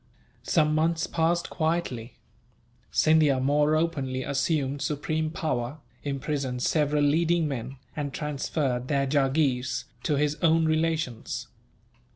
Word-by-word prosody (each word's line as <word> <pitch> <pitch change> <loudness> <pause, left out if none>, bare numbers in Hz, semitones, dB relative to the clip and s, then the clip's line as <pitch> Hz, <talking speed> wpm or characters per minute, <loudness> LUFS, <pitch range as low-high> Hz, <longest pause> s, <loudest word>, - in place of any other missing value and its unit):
Some 155 -2 +2
months 165 +2 +1
passed 170 0 0
quietly. 155 -8 -2 0.7
Scindia 155 -4 +4
more 145 +3 +3
openly 140 -6 -1
assumed 140 0 0
supreme 155 +2 -1
power, 135 -4 -2 0.2
imprisoned 135 -3 -2
several 150 -1 +2
leading 165 +2 +2
men, 135 -1 -5 0.2
and 145 -2 -3
transferred 140 -3 -2
their 140 -1 +1
jagheers 135 -2 +1 0.2
to 150 - 0
his 150 +1 +1
own 165 -1 +4
relations. 155 -6 -1
150 Hz, 110 wpm, -27 LUFS, 135-160 Hz, 0.7 s, Scindia